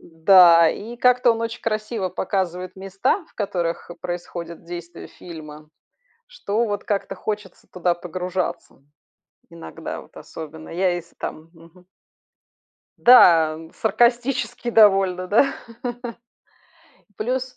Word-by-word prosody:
Да, 170 0 +6
и 230 +4 -7
как-то 250 -1 +4
он 225 - -5
очень 230 +1 -4
красиво 215 -2 -2
показывает 185 0 -3
места, 195 - -1
в - - -29
которых 175 -5 -3
происходит 175 -1 -6
действие 175 0 -9
фильма, 155 -3 -11 0.6
что 235 - -2
вот 205 -1 -3
как-то 205 -2 -2
хочется 210 -3 -6
туда 180 -1 0
погружаться, 180 -3 -5 0.7
иногда 80 -1 -8
вот - - -20
особенно. 160 0 -10
Я 185 +2 +1
если 170 -1 -9
там 160 +1 -7
Мгм. 170 +2 -19 1.1
Да, 165 -10 +6 0.2
саркастически 240 +2 0
довольно, 195 -4 +4
да? 275 +7 +3 1.6
Плюс 255 +3 -3
185 Hz, 105 wpm, -22 LUFS, 170-220 Hz, 1.6 s, Да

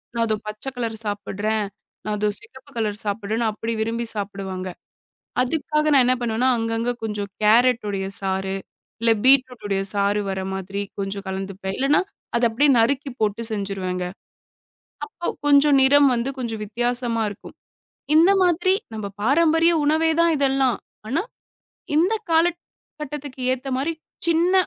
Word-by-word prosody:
"நான் 230 0 +2
இதோ 215 - +1
பச்சை 215 +5 -5
கலர் 230 -2 -3
சாப்பிடுறேன். 205 +1 -2 0.4
நான் 210 0 -1
இதோ 210 0 +2
சிகப்பு 285 - -15
கலர் 210 -2 -1
சாப்பிடுறேன்." 215 +2 -1
அப்படி 225 +2 -4
விரும்பி 230 +2 -1
சாப்பிடுவாங்க. 195 -2 -4 0.8
அதுக்காக 300 +3 0
நான் 270 -3 +6
என்ன 255 - +4
பண்ணுவேன்னா, 240 +1 +1
அங்கங்க 225 +1 -1
கொஞ்சம் 210 -2 -3
கேரட்டுடைய 215 -3 +3
சாறு. 190 0 -1 0.4
இல்ல 230 0 +4
பீட்ரூட்டுடைய 250 -7 +3
சாறு 200 +1 +2
வர்ற 190 0 -2
மாதிரி 195 +1 -4 0.2
கொஞ்சம் 200 0 -4
கலந்துப்பேன். 190 0 -4
இல்லன்னா 275 +3 +3 0.3
அத 235 - +1
அப்படியே 280 +6 +3
நறுக்கி 275 +5 +1
போட்டு 215 +1 0
செஞ்சுருவேங்க. 195 -3 -3 1.0
அப்ப 385 -5 -4
கொஞ்சம் 285 0 +5
நிறம் 285 +1 +6
வந்து 240 +3 -1
கொஞ்சம் 230 -4 -3
வித்தியாசமாருக்கும். 230 -1 -2 0.6
இந்த 330 +4 +6
மாதிரி 360 +1 +3 0.2
நம்ம 215 -2 -4
பாரம்பரிய 325 +7 +4
உணவே 315 +2 +3
தான் 335 0 +4
இதெல்லாம். 270 -3 +2 0.3
ஆனா, 300 +9 0 0.7
இந்த 350 +8 +3 0.2
காலக் 335 +1 +3 0.4
கட்டத்துக்கு 285 -2 -6
ஏத்த 260 +1 -5
மாரி 295 +5 -1 0.3
சின்ன 335 +2 +3
230 Hz, 130 wpm, -23 LUFS, 205-280 Hz, 1.0 s, நான்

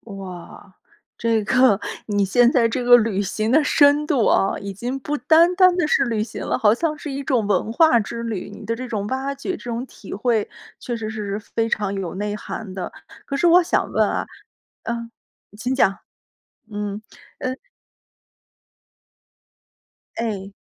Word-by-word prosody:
哇， 190 0 -10 0.4
这 230 -2 +1
个。 250 -2 +4 0.3
你 205 -2 +1
现 240 +5 +4
在 245 -2 +3
这 250 +3 -2
个 245 0 +8
旅 215 -4 0
行 215 +3 -2
的 305 +4 +5
深 290 0 +4
度 270 -8 +2
啊， 195 - +2
已 200 0 -6
经 245 +7 -4
不 295 +3 -3
单 335 +4 +4
单 365 -1 +5
地 350 - +2
是 275 -2 +2
旅 225 -3 -1
行 220 - -7
了， - - 0
好 210 -1 +4
像 305 +5 -1
是 295 0 -6
一 275 +1 -4
种 250 -5 +1
文 205 +2 0
化 315 -4 +5
之 230 +2 -5
旅， 220 -5 -4
你 - - -11
的 230 - -1
这 255 +2 -6
种 210 -4 -3
挖 265 +3 -2
掘， 275 +7 -4
这 - - -4
种 240 +1 -3
体 210 - -11
会 220 0 0 0.3
确 240 - -4
实 220 -2 -4
是 210 -2 -4
非 225 +1 -2
常 205 -3 -1
有 190 -3 -4
内 205 +1 -3
涵 210 -2 -7
的。 185 -2 -5 0.3
可 275 - -4
是 275 - +1
我 350 +2 +7
想 340 - 0
问 - - +2
啊， - - -2 0.6
嗯， 235 0 -4 0.5
请 250 +4 -2
讲， 195 -7 +2 0.7
嗯。 205 0 -4 0.4
呃 255 - -2 2.7
哎，。 205 -4 -3
230 Hz, 185 characters per minute, -22 LUFS, 205-265 Hz, 2.7 s, 个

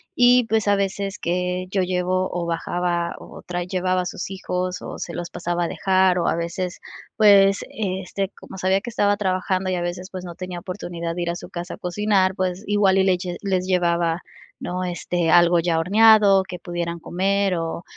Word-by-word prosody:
y 245 0 +5
pues, 220 -2 +1
a 205 - +4
veces, 195 0 -2
que 180 +1 -1
yo 190 -1 +1
llevo 185 0 0
o 175 -1 -2
bajaba, 170 0 -1
o - - -12
trae 175 -1 -4
llevaba 185 0 0
a 180 - -4
sus 180 - -5
hijos, 180 -2 -3
o - - -7
se 170 - -5
los 175 0 -5
pasaba 175 0 -2
a - - -1
dejar, 185 0 +2
o 170 - 0
a - - +2
veces, 170 +2 -4 0.4
pues 195 -2 +6
este, 195 -1 -3
como - - -11
sabía 190 +2 +2
que 240 - -6
estaba 205 -2 +2
trabajando, 185 -1 -1
y - - 0
a 175 - -2
veces, 175 +2 -4
pues, 185 -1 -6
no 175 -1 -8
tenía 180 0 -6
oportunidad 170 -2 -5
de 175 - -2
ir 170 - -2
a - - -4
su - - -9
casa 175 +1 -6
a - - -20
cocinar, 190 0 +1
pues 185 +1 -2
igual 205 -2 +3
y - - +4
les 190 -1 +3
lle 175 -1 -5
les 185 -2 0
llevaba, 170 -2 +1 0.4
¿no?, 180 +1 -3
este, 175 -1 -1
algo 175 0 +5
ya 165 -1 +1
horneado 205 +1 +6
que 185 -1 -8
pudieran 170 -1 -4
comer, 195 +2 0
o 165 +1 -4
185 Hz, 205 wpm, -22 LUFS, 175-195 Hz, 0.4 s, pues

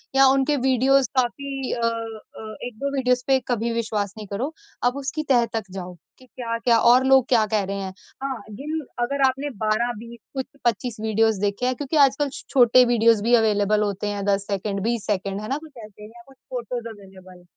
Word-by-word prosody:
या 270 - +7
उनके 270 +2 +3
वीडियोज़ 265 0 +3
काफ़ी 270 +2 -1
अ - - -3 0.6
अ, 215 -1 -8
1-2 245 +4 -4
वीडियोज़ 250 -2 +1
पे 265 -1 +4
कभी 235 -1 -1
विश्वास 215 -3 -2
नहीं 215 -1 -8
करो। 245 +11 -3 0.3
आप 245 +1 +2
उसकी 280 +3 -3
तह 240 -3 +4
तक 225 - -1
जाओ 180 -1 -7 0.3
कि 260 - -17
क्या-क्या 235 -1 0
और 245 +3 +5
लोग 265 -2 +5
क्या 230 -4 +4
कह 215 -2 +2
रहे 200 - -4
हैं? 190 -1 -5 0.3
हाँ, 265 -4 -3
जिन 295 +9 -4 0.2
अगर 280 +3 -2
आपने 270 +3 -2
12-20 235 +1 -2
कुछ 265 -1 -3 0.2
25 235 +1 0
वीडियोज़ 220 -1 +2
देखे 205 +4 -1
हैं 255 - +1
क्योंकि 290 +3 -2
आजकल 280 0 +4 0.2
छोटे 250 -1 +6
वीडियोज़ 230 -2 +4
भी 235 +2 +2
अवेलेबल 210 -2 +2
होते 205 0 -2
हैं 205 -1 -3
10 200 -1 +1
सेकंड, 200 0 -2
20 230 -1 -1
सेकंड, 195 -1 -2
है 215 - -6
ना? 270 - 0
कुछ 310 0 -12
ऐसे 210 0 -13
या 235 +2 -15
कुछ 270 -1 -19
फोटोज़ 240 -1 -4
अवेलेबल। 190 -4 -14
235 Hz, 190 wpm, -23 LUFS, 210-265 Hz, 0.6 s, या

